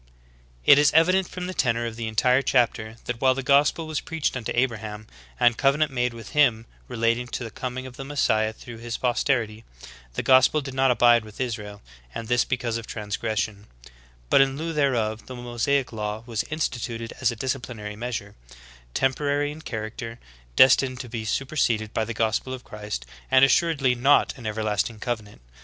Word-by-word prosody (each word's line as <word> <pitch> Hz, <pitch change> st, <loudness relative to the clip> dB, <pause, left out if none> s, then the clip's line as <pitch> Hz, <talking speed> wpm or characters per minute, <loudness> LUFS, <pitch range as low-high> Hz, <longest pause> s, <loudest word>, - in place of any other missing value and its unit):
"* -, -, -31 dB
22. -, -, +7 dB
It 140 Hz, -, +9 dB
is 145 Hz, -, +5 dB
evident 180 Hz, +4 st, +4 dB
from 180 Hz, -1 st, -6 dB
the 185 Hz, -, -4 dB
tenor 120 Hz, -7 st, +1 dB
of 115 Hz, -1 st, -5 dB
the 115 Hz, -1 st, -4 dB
entire 125 Hz, +4 st, +3 dB
chapter, 115 Hz, -4 st, +1 dB
that 120 Hz, -1 st, -4 dB
while 130 Hz, -1 st, +4 dB
the 135 Hz, -, -3 dB
gospel 145 Hz, +4 st, +3 dB
was 155 Hz, -2 st, -3 dB
preached 160 Hz, -4 st, -2 dB
unto 120 Hz, -4 st, -4 dB
Abraham, 110 Hz, -4 st, -2 dB, 0.3 s
and 120 Hz, -2 st, +3 dB
covenant 145 Hz, +2 st, +2 dB
made 125 Hz, -1 st, 0 dB
with 115 Hz, -, -9 dB
him 120 Hz, -7 st, +3 dB, 0.2 s
relating 115 Hz, 0 st, 0 dB
to 125 Hz, -, -5 dB
the 115 Hz, -, -7 dB
coming 130 Hz, +3 st, -5 dB
of 125 Hz, -1 st, -10 dB
the 135 Hz, -, -6 dB
Messiah 110 Hz, -6 st, +1 dB
through 115 Hz, +1 st, -11 dB
his 120 Hz, 0 st, -4 dB
posterity, 120 Hz, -3 st, 0 dB, 0.5 s
the -, -, -2 dB
gospel 130 Hz, +3 st, +5 dB
did 135 Hz, -2 st, -6 dB
not 135 Hz, 0 st, +3 dB
abide 120 Hz, -2 st, +5 dB
with 110 Hz, -1 st, -13 dB
Israel, 105 Hz, -5 st, -4 dB, 0.3 s
and 115 Hz, -, -5 dB
this 120 Hz, +1 st, +3 dB
because 120 Hz, -3 st, -2 dB
of 115 Hz, -, -8 dB
transgression;^ 105 Hz, -1 st, -3 dB, 0.7 s
but -, -, +7 dB
in 135 Hz, 0 st, +2 dB
lieu 165 Hz, +2 st, -3 dB
thereof 120 Hz, -7 st, 0 dB
the 130 Hz, -, -7 dB
Mosaic 120 Hz, +2 st, -1 dB
law 105 Hz, 0 st, -4 dB
was 115 Hz, -3 st, -2 dB
instituted 120 Hz, -6 st, -3 dB
as 130 Hz, -, +3 dB
a 115 Hz, -, -3 dB
disciplinary 120 Hz, -4 st, -4 dB
measure, 110 Hz, -3 st, -5 dB, 0.6 s
tem 135 Hz, 0 st, +2 dB
porary 145 Hz, +1 st, -1 dB
in 155 Hz, +2 st, -10 dB
character, 115 Hz, -1 st, -6 dB, 0.4 s
destined 130 Hz, -1 st, +5 dB
to 125 Hz, -, -9 dB
be 110 Hz, -1 st, -5 dB
superseded 115 Hz, -4 st, 0 dB
by 110 Hz, -, 0 dB
the 115 Hz, 0 st, -5 dB
gospel 115 Hz, +4 st, 0 dB
of 125 Hz, -, -12 dB
Christ, 105 Hz, -, -6 dB, 0.2 s
and 130 Hz, +1 st, +7 dB
assuredly 140 Hz, -3 st, +2 dB
not 135 Hz, +4 st, +3 dB
an 120 Hz, -6 st, -7 dB
everlasting 110 Hz, +1 st, -1 dB
covenant. 105 Hz, -, -5 dB
120 Hz, 185 wpm, -25 LUFS, 110-135 Hz, 0.7 s, It